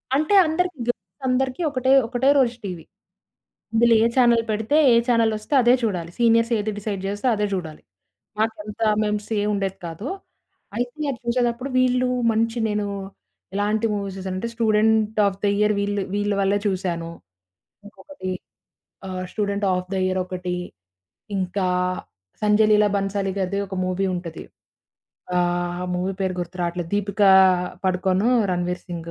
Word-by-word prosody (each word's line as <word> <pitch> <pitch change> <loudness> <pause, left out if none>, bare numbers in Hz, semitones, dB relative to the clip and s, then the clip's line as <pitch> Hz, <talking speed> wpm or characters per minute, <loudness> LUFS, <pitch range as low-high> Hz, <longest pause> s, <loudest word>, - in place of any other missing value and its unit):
అంటే 310 +8 +2
అందరికి 360 +1 -1
గర్ల్స్ 195 -1 -5
అందరికి 260 +3 0
ఒకటే, 260 -1 0 0.2
ఒకటే 250 +2 +1
రోజు 245 -3 +3
టీవీ. 180 -4 -6 0.9
ఇందులో 230 +1 +5
ఏ - - +4
చానెల్ 235 -3 +4
పెడితే, 220 +7 +1 0.2
ఏ - - +5
చానెల్ 230 -2 +3
వస్తే 215 +7 -7
అదే 240 0 +5
చూడాలి. 175 -6 -2
సీనియర్స్ 230 0 +3
ఏది 215 +1 -2
డిసైడ్ 200 -2 -4
జేస్తే 205 +5 -2
అదే 210 0 0
జూడాలి. 160 -5 -5 0.6
మాకు 220 0 +1
అంత 210 +1 -9 0.2
మెమ్స్ 210 0 -2
ఏమి 205 - 0
ఉండేది 195 -1 -2
కాదు, 165 - -7 0.7
అయితే 265 +5 -2
చూసేటప్పుడు 240 +2 0
వీళ్ళు 255 0 +2 0.2
మంచి 225 +1 0
నేను 210 0 -1 0.7
ఎలాంటి 210 +2 0
movies 200 -2 -4
చూసానంటే 190 +4 -4
'student 220 -1 +2
of 195 -1 0
the - - +3
year' 210 0 +3
వీళ్ళు 200 0 -1
వీళ్ళ 205 0 0
వల్లే 200 +1 +2
చూసాను, 180 -4 -2 0.8
ఇంకొకటి 205 -3 -8 0.8
ఆహ్, 185 -1 -4
'స్టూడెంట్ 200 -1 -1
ఒఎఫ్ 180 0 -3
ద - - -1
యియర్' 185 0 0
ఒకటి, 180 -1 -4 0.8
ఇంకా 185 0 -1 0.7
'సంజయ్ 210 +1 +4
లీలా 210 0 +5
భన్సాలి' 195 -1 -1
గారిది 195 +1 -1
ఒక 190 - -7
మూవీ 185 +1 -1
ఉంటది. 175 -2 -6 0.9
ఆహ్, 175 0 0
మూవీ 180 +2 -1
పేరు 190 -1 0
గుర్తు 175 +1 -7
రావట్లేదు 170 -1 -3
దీపిక 205 0 -1 0.6
పడుకోను 185 +3 +1 0.2
'రణ్వీర్ 180 0 -2
సింగ్' 170 -2 -6
205 Hz, 140 wpm, -23 LUFS, 185-230 Hz, 0.9 s, ఇందులో